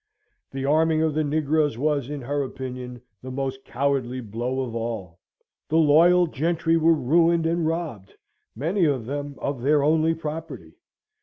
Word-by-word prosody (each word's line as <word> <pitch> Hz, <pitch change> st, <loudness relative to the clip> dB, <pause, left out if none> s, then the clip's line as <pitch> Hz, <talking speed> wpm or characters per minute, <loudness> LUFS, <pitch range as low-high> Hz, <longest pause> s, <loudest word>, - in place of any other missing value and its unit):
The 135 Hz, 0 st, -4 dB
arming 160 Hz, +2 st, +3 dB
of 160 Hz, -1 st, +1 dB
the 155 Hz, +1 st, +1 dB
negroes 150 Hz, -2 st, +1 dB
was, 145 Hz, -1 st, 0 dB
in 145 Hz, -1 st, -5 dB
her 145 Hz, +3 st, -2 dB
opinion, 125 Hz, -2 st, -6 dB, 0.2 s
the 130 Hz, -, -8 dB
most 135 Hz, 0 st, -4 dB
cowardly 130 Hz, -1 st, -1 dB
blow 120 Hz, +3 st, -3 dB
of 125 Hz, -3 st, -4 dB
all. 110 Hz, -7 st, -5 dB, 0.5 s
The 160 Hz, -, +2 dB
loyal 165 Hz, +3 st, +5 dB
gentry 165 Hz, +2 st, 0 dB
were 165 Hz, 0 st, +4 dB
ruined, 165 Hz, +4 st, +2 dB
and 165 Hz, 0 st, 0 dB
robbed, 155 Hz, -, -4 dB, 0.4 s
many 170 Hz, -, +1 dB
of 135 Hz, -7 st, 0 dB
them, 145 Hz, +2 st, -5 dB
of 140 Hz, -3 st, -4 dB
their 145 Hz, +2 st, +3 dB
only 160 Hz, +2 st, +3 dB
property. 155 Hz, -, -7 dB
145 Hz, 155 wpm, -24 LUFS, 130-160 Hz, 0.5 s, loyal